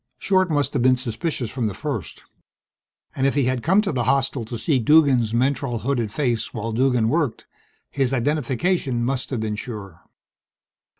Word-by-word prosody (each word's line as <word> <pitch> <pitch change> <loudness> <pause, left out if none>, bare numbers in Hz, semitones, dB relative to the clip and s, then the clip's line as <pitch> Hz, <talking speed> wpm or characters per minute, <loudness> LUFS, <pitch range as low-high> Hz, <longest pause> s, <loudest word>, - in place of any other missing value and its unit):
Short 185 -2 +2
must 145 -2 +1
have 135 - 0
been 130 +1 +4
suspicious 125 0 -3
from 125 -4 -1
the 100 - -4
first. - - -5 0.9
And 135 0 +1
if 140 - 0
he 140 - +2
had 130 0 0
come 190 - +3
to 200 - -1
the 125 -4 -1
hostel 135 -1 +1
to 115 +1 -6
see 135 +3 +1
Duggan's 130 -4 +4
mentrol 125 -1 0
hooded 120 -5 -1
face, 120 -3 -1
while 115 +1 -3
Duggan 125 -1 +2
worked, 145 -2 -1 0.5
his 135 -3 0
identification 135 0 0
must 130 0 -2
have 125 -5 -2
been 110 -1 -2
sure. 100 -6 -8
130 Hz, 170 wpm, -22 LUFS, 115-140 Hz, 0.9 s, been